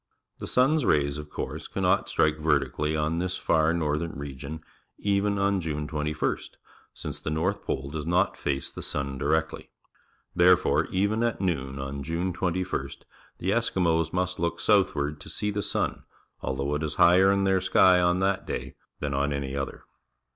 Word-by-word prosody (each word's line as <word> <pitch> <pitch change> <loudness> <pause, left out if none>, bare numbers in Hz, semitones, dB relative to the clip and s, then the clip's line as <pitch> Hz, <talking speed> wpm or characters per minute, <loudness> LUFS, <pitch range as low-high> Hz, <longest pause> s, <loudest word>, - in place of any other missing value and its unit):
The - - -5
sun's 145 +4 +3
rays, 70 -5 +2
of 75 0 -8
course, - - -5
cannot - - +1
strike 75 -1 +2
vertically 75 0 +1
on 75 +2 0
this 90 +1 -2
far 80 0 +2
northern 80 -1 -1
region 70 +2 -7 0.4
even 100 0 +1
on 100 -1 +1
June 75 -2 -3
21st, 75 0 -2 0.4
since - - -7
the - - -4
north 85 +7 -1
pole 70 +1 -3
does 75 0 -4
not 90 +3 +2
face 70 -1 -2
the - - -8
sun 70 -2 -3
directly. 80 +3 -1 0.7
Therefore, 90 0 +4
even 100 +4 0
at 120 -1 0
noon 70 -8 -2
on 70 +1 -5
June 85 +5 -2
21st, 90 -6 -2 0.4
the 95 - -1
Eskimos 85 -8 +1
must 90 +1 -1
look 85 0 -1
southward 75 +1 +2
to - - -10
see 105 - -2
the 105 0 -2
sun, - - -1 0.4
although 70 +2 -2
it 75 - -1
is 75 -1 -3
higher 95 +3 +6
in 100 0 +2
their 95 -1 +3
^ky 90 -1 +5
on 90 0 +3
that 95 +1 0
day - - -4 0.3
than 70 -1 -2
on 70 +2 0
any 70 -1 -3
other. 70 0 -4
80 Hz, 170 wpm, -27 LUFS, 75-95 Hz, 0.7 s, higher